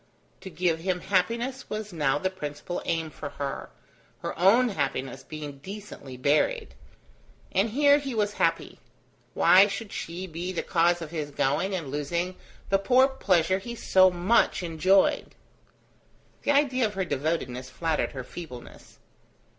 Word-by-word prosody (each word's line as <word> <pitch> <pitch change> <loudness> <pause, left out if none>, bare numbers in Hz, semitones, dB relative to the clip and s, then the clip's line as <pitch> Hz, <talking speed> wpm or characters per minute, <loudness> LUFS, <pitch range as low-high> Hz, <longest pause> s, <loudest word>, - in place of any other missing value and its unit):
To 190 - -9
give 170 -1 0
him 180 +1 -1
happiness 235 +7 -1
was 215 -2 -5
now 150 -4 +1
the 185 +5 -1
principal 150 0 -5
aim 165 -1 -1
for 145 - -7
her, 140 -1 -5 0.5
her - - -3
own 220 +8 +5
happiness 135 - -3
being 150 -1 -8
decently 190 -7 -9
buried; 145 +4 +1 0.8
and 195 +4 +2
here 285 +4 +4
he 275 -4 -5
was 205 -1 0
happy: - - 0 0.6
why 190 +2 +7
should 210 +1 -5
she 175 +3 -5
be 175 +1 -5
the 180 - -3
cause 170 0 +2
of 155 - -9
his 155 -3 -3
going 145 +7 0
and 155 -7 -5
losing 170 +6 -2 0.3
the 195 - +3
poor 255 +6 +5
pleasure 190 -8 +2
he 235 +4 -7
so 185 -4 +5
much 185 +3 +2
enjoyed? 180 +4 +2 1.1
The - - -4
idea 265 -4 +3
of 210 - -9
her 190 -1 -1
devotedness 135 -4 -2
flattered 160 +4 -1
her 130 -2 -5
feebleness. 125 -4 -11
180 Hz, 145 wpm, -27 LUFS, 150-205 Hz, 1.1 s, why